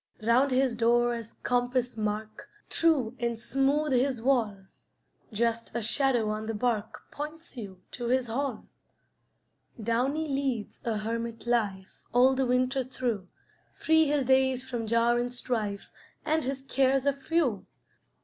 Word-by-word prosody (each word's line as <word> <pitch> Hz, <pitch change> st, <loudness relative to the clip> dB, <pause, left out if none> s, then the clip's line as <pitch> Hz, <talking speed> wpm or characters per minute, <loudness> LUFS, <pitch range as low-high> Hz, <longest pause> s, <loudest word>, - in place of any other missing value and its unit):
Round 245 Hz, +5 st, +4 dB
his 255 Hz, -2 st, +2 dB
door 240 Hz, +1 st, +3 dB
as 230 Hz, -2 st, -7 dB
compass 245 Hz, 0 st, 0 dB
mark, 215 Hz, 0 st, -4 dB, 0.2 s
True 275 Hz, -8 st, +2 dB
and 235 Hz, -2 st, -1 dB
smooth 275 Hz, +5 st, +1 dB
his 255 Hz, 0 st, +2 dB
wall; 225 Hz, -6 st, +1 dB, 0.7 s
Just 230 Hz, +2 st, -1 dB
a 235 Hz, -, -1 dB
shadow 235 Hz, -1 st, +2 dB
on 215 Hz, +1 st, -4 dB
the 225 Hz, -, -2 dB
bark 220 Hz, -1 st, -1 dB
Points 305 Hz, +1 st, -7 dB
you 195 Hz, -6 st, -8 dB
to 240 Hz, -1 st, -4 dB
his 255 Hz, +1 st, +2 dB
hall. 250 Hz, 0 st, -3 dB, 1.1 s
Downy 255 Hz, +8 st, 0 dB
leads 270 Hz, -6 st, -2 dB
a 225 Hz, -2 st, 0 dB
hermit 230 Hz, +2 st, -4 dB
life 205 Hz, -6 st, -1 dB
All 255 Hz, +2 st, +6 dB
the 265 Hz, -1 st, 0 dB
winter 255 Hz, +2 st, +2 dB
through; 240 Hz, -6 st, -3 dB, 0.5 s
Free 320 Hz, -1 st, +4 dB
his 285 Hz, -2 st, +1 dB
days 260 Hz, 0 st, +2 dB
from 240 Hz, -3 st, -3 dB
jar 230 Hz, +1 st, +3 dB
and 245 Hz, 0 st, -2 dB
strife, 220 Hz, -5 st, -3 dB, 0.3 s
And 315 Hz, 0 st, +1 dB
his 265 Hz, 0 st, -3 dB
cares 270 Hz, 0 st, +2 dB
are 280 Hz, -, +3 dB
few. 275 Hz, -, -1 dB
245 Hz, 140 wpm, -28 LUFS, 225-270 Hz, 1.1 s, All